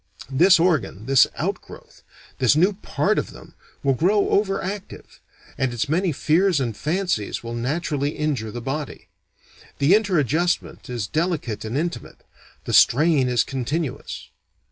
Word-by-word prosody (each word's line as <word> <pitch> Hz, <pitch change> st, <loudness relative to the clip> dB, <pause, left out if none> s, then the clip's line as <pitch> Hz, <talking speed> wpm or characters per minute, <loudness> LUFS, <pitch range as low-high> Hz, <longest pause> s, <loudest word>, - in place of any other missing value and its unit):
This 170 Hz, +7 st, +5 dB
organ, 145 Hz, -, 0 dB
this 135 Hz, 0 st, +5 dB
outgrowth, -, -, -6 dB, 0.4 s
this 130 Hz, +2 st, +4 dB
new 185 Hz, +6 st, +3 dB
part 195 Hz, -, -1 dB
of -, -, -4 dB
them, -, -, -14 dB, 0.3 s
will 135 Hz, -1 st, +3 dB
grow 195 Hz, -, +2 dB
over 195 Hz, -1 st, +1 dB
active, 195 Hz, +1 st, -7 dB, 0.4 s
and 130 Hz, -1 st, +1 dB
its 120 Hz, -2 st, -2 dB
many 175 Hz, +4 st, +1 dB
fears 165 Hz, +4 st, +2 dB
and 120 Hz, -5 st, -2 dB
fancies 165 Hz, -, -2 dB
will 115 Hz, 0 st, -6 dB
naturally 145 Hz, +4 st, -2 dB
injure 140 Hz, -8 st, -2 dB
the 120 Hz, +3 st, -6 dB
body. 140 Hz, +4 st, -5 dB, 0.7 s
The 145 Hz, +6 st, +4 dB
interadjustment 175 Hz, -, 0 dB
is 120 Hz, -4 st, -3 dB
delicate 155 Hz, -, -2 dB
and 115 Hz, +5 st, -3 dB
intimate, 155 Hz, -6 st, -4 dB, 0.4 s
the -, -, -3 dB
strain 145 Hz, -1 st, +4 dB
is 125 Hz, -1 st, +2 dB
continuous. 135 Hz, +3 st, -4 dB
150 Hz, 140 wpm, -22 LUFS, 125-175 Hz, 0.7 s, This